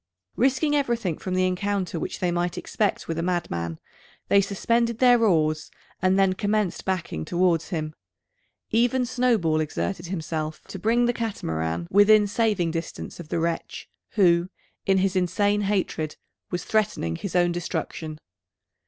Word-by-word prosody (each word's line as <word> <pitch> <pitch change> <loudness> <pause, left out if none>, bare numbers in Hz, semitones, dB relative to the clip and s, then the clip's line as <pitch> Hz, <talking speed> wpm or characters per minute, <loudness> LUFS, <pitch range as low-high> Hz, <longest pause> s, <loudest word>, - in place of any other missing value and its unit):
Risking 270 +4 +2
everything 235 - 0
from 185 -1 -3
the 185 0 +3
encounter 185 -1 -1
which - - -4
they 180 -1 +1
might 175 +1 -1
expect 210 -2 -1
with 165 0 -2
a - - 0
madman, 85 - -2 0.5
they 200 - +6
suspended 230 +4 0
their 245 -1 +5
oars, 155 -6 +2 0.3
and 185 +1 +3
then 195 -1 +4
commenced 205 -1 -1
backing 180 - -2
towards 170 - +1
him. 155 -4 -3 0.8
Even 245 +3 +2
Snowball 235 -11 +2
exerted 170 +3 -2
himself 160 -3 -4
to 195 - -6
bring 235 +5 +2
the 240 - +2
Catamaran 85 - -3
within 210 +1 +6
saving 205 -5 +1
distance 165 +1 -5
of 165 -3 -9
the - - -1
wretch 165 0 -3 0.3
who, 175 -3 +4 0.4
in 195 0 +4
his 190 0 +1
insane 205 +3 +2
hatred, 190 -6 -1 0.3
was 175 -1 -3
threatening 200 - 0
his 185 - -5
own 175 -1 +4
destruction. 165 -2 -4
185 Hz, 145 wpm, -25 LUFS, 165-215 Hz, 0.8 s, they